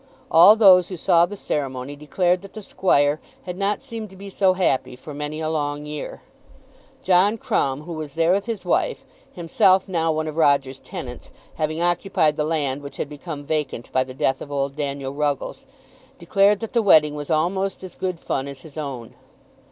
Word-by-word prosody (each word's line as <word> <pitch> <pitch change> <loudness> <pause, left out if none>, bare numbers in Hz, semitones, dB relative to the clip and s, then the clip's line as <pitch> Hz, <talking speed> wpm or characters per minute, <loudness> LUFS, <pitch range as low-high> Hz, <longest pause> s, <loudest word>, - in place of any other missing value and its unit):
All 175 +6 +8
those 185 -5 +6
who 185 - -6
saw 170 +1 +4
the 205 - -7
ceremony 135 -6 -4
declared 175 +5 0
that 195 -1 -13
the 215 - -8
squire 145 -6 +1 0.2
had 180 - -6
not 200 +2 -1
seemed 225 -2 -7
to 190 - -15
be 195 +1 -10
so 190 -1 +3
happy 130 -9 0
for 145 +4 -10
many 150 +2 -5
a 160 - -2
long 145 -2 -2
year. 150 0 -7 0.8
John 190 +4 +3
Crumb, 135 -8 -1
who 170 +2 -7
was 155 -3 -7
there 165 +1 +3
with 200 +4 0
his 230 -3 -4
wife, - - 0 0.3
himself 185 +2 +2
now 165 -3 0
one 155 0 -2
of 155 0 -6
Roger's 140 -4 +2
tenants, - - -8 0.2
having 155 +2 -2
occupied 175 -3 +1
the 150 - -1
land 145 -3 -1
which 140 0 -10
had 145 - -3
become 150 0 -7
vacant 145 -5 -3
by 130 - +2
the 130 0 -11
death 135 - 0
of 145 - -8
old 140 -1 -2
Daniel 140 -2 -4
Ruggles, 145 -1 -3 0.5
declared 195 +4 +2
that 225 - -6
the 235 - +3
wedding 155 -7 +5
was 145 -1 -6
almost 190 +5 0
as 185 -2 -8
good 185 -3 -4
fun 135 -3 -3
as 140 -1 -9
his 160 0 -14
own. 130 -6 -6
155 Hz, 190 wpm, -22 LUFS, 145-185 Hz, 0.8 s, All